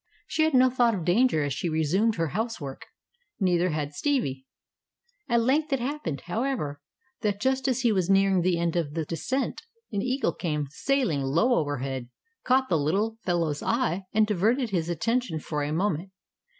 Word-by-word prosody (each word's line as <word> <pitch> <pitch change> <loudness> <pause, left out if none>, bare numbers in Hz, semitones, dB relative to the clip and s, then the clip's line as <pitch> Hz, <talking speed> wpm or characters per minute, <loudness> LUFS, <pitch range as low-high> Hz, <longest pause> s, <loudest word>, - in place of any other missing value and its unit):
She 315 - -1
had 315 -3 +1
no 255 0 +5
thought 240 -3 +3
of 175 -4 -4
danger 185 - +3
as 145 -1 -1
she 175 - -2
resumed 175 +8 +1
her 165 -2 -1
housework. 175 - -4 0.5
Neither 180 -2 +2
had 150 -2 -3
Stevie. 140 - -1 0.8
At 235 -1 +3
length 295 +5 +1
it 270 - +2
happened, 240 - -3
however, 175 - -2 0.4
that 205 -3 0
just 265 +2 +1
as 260 -1 +1
he 240 -3 +3
was 190 -3 +1
nearing 195 -1 +4
the 180 0 +2
end 170 0 0
of 160 -3 -1
the 160 -2 -1
descent, 260 - -2 0.3
an 200 -2 -1
eagle 255 +3 0
came 150 -4 -2
sailing 245 - 0
low 165 - +2
overhead, 135 - -2 0.3
caught 260 +1 +3
the 170 -5 +2
little 205 +10 0
fellow's 165 -6 0
eye, 230 -6 0
and 215 0 +4
diverted 220 +5 +1
his 170 -3 -1
attention 230 - 0
for 150 0 -3
a 145 +1 -2
moment. 175 +1 -1
190 Hz, 175 wpm, -27 LUFS, 155-245 Hz, 0.8 s, no